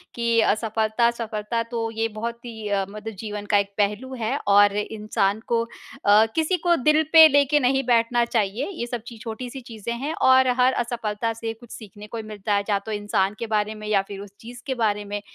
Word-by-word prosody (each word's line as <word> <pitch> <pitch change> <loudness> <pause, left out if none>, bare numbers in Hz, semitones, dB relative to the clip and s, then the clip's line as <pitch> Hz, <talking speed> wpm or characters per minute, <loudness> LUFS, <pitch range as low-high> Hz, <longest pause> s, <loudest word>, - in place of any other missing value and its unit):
कि 235 -1 +1
असफलता-सफलता 220 +1 0
तो 230 -1 -2
ये 225 0 -1
बहुत 230 +2 -5
ही 220 -3 -7
अ, 195 -1 0
मतलब 215 +2 -7
जीवन 210 -1 -5
का 205 - +5
एक 200 0 -1
पहलू 210 +6 -1
है 230 +5 -1
और 205 0 +5
इंसान 210 -1 -1
को 230 -1 +1
अ, 215 -2 +1
किसी 325 +3 +1
को 345 +1 +2
दिल 305 +2 +3
पे 320 -1 +10
लेके 285 0 +3
नहीं 270 0 +2
बैठना 235 0 +3
चाहिए 225 +2 -1
ये 330 -11 -5
सब 240 -1 -4
ची 235 - -9
छोटी-सी 245 +4 -6
चीज़ें 235 -2 -6
हैं। 275 +6 -3 0.2
और 260 0 +6
हर 255 +1 +4
असफलता 230 -2 -2
से 225 0 -5
कुछ 230 +1 -17
सीखने 210 -1 -11
को 225 +1 -5
मिलता 210 -1 -4
है 200 - +1
या 205 - +3
तो 210 +2 -8
इंसान 205 -2 0
के 230 - -4
बारे 215 0 -1
में 215 0 -8
या 205 -2 +3
फिर 200 -1 -8
उस 200 0 -10
चीज़ 240 +1 -11
के 265 - 0
बारे 210 -3 0
में, 205 0 -4
225 Hz, 205 wpm, -23 LUFS, 210-240 Hz, 0.2 s, पे